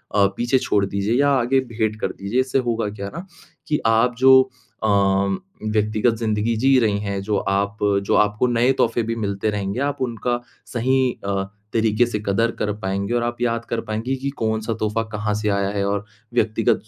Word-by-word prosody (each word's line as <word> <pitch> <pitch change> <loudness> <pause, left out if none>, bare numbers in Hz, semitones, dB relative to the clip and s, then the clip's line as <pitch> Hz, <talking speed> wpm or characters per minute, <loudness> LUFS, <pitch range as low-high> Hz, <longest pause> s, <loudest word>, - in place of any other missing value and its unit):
अ, 100 -1 +5
पीछे 120 +2 +2
छोड़ 100 -4 +1
दीजिए 100 +3 -1
या 145 - +4
आगे 130 0 +3
भेंट 110 -3 -2
कर - - +1
दीजिए। 100 +6 -2
इससे 130 +1 0
होगा 115 -2 -1
क्या 100 -1 -6
न 170 +3 -6 0.4
कि 150 - +1
आप 115 +2 +3
जो 130 0 +8 0.4
अ, - - +2 0.8
व्यक्तिगत 110 +2 +1
ज़िंदगी 110 0 0
जी 135 +3 +4
रही 105 -3 +2
हैं, 100 -1 -3
जो 105 0 0
आप 100 +2 -1 0.3
जो - - +2
आपको 105 +4 +2
नए 120 +2 +3
तोहफ़े 115 0 +1
भी 115 +1 -2
मिलते 100 0 -1
रहेंगे, 100 +3 -3
आप 145 -1 -2
उनका 120 0 -1 0.3
सही 130 +1 +2
अ, 100 -1 0 0.3
तरीके 110 +1 +3
से 105 -3 -2
कदर 115 +4 +2
कर 105 -1 0
पाएँगे 100 +3 -1
और 120 - +1
आप 120 0 -3
याद 115 -1 0
कर 115 - -1
पाएँगी 110 +5 -2
कि 140 +1 -3
कौन 110 0 0
सा 115 +1 -2
तोहफ़ा 110 +1 0
कहाँ 105 0 -1
से 105 - 0
आया 100 0 +1
है 100 - +1
और 100 0 -1 0.3
व्यक्तिगत 110 -2 +2
110 Hz, 195 wpm, -22 LUFS, 105-120 Hz, 0.8 s, जो